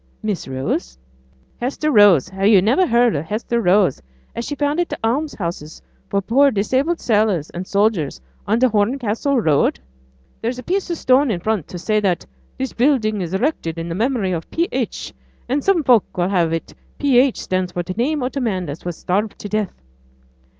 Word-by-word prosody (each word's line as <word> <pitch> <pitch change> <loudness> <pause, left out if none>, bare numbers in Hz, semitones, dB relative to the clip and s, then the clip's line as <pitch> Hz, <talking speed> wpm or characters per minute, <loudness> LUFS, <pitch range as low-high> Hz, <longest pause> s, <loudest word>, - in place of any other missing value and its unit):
'Miss 210 -4 -3
Rose?' 130 - -3 0.6
'Hester 280 +5 -1
Rose! 205 - +6
have 195 +1 0
yo' 210 -3 +7
niver 250 - +3
heared 235 - +3
of 145 +2 -2
Hester 230 +5 -2
Rose, 185 - +3 0.4
she 265 +5 -4
as - - -30
founded 300 +4 0
t' - - -3
alms 280 +7 0
houses 170 -4 -5 0.3
for 200 0 0
poor 275 +7 +4
disabled 260 +9 0
sailors 205 - +1
and 180 +2 -6
soldiers 200 - +1 0.3
on 220 +2 +2
t' 255 - +4
Horncastle 240 +3 +1
road? 155 -9 +2 0.6
There's 240 +2 -2
a 250 - -7
piece 380 +1 -1
o' 340 - -1
stone 265 -1 +3
in 190 -6 -1
front 210 -3 -1
to 180 - -7
say 215 +5 0
that 190 -4 0 0.3
"This 265 -1 -3
building 230 -6 +1
is 175 +1 -3
erected 190 - -1
in 165 0 -4
memory 225 -2 0
of 165 -2 -4
P. 335 +1 0
H." - - -3 0.3
and 270 +3 -1
some 385 -5 +2
folk 240 -9 +3
will 175 +1 +1
have 175 -4 +1
it 165 0 -4 0.2
P. 275 -4 +4
H. 260 -1 +2
stands 185 -1 -2
for 175 - -2
t' 185 - -5
name 270 +5 0
o' 250 - 0
th' 275 - -4
man 190 -8 -2
as 145 +4 -7
was 175 -2 -5
starved 205 +4 -1
to - - -7
death.' 210 - -3
215 Hz, 190 wpm, -20 LUFS, 180-260 Hz, 0.6 s, yo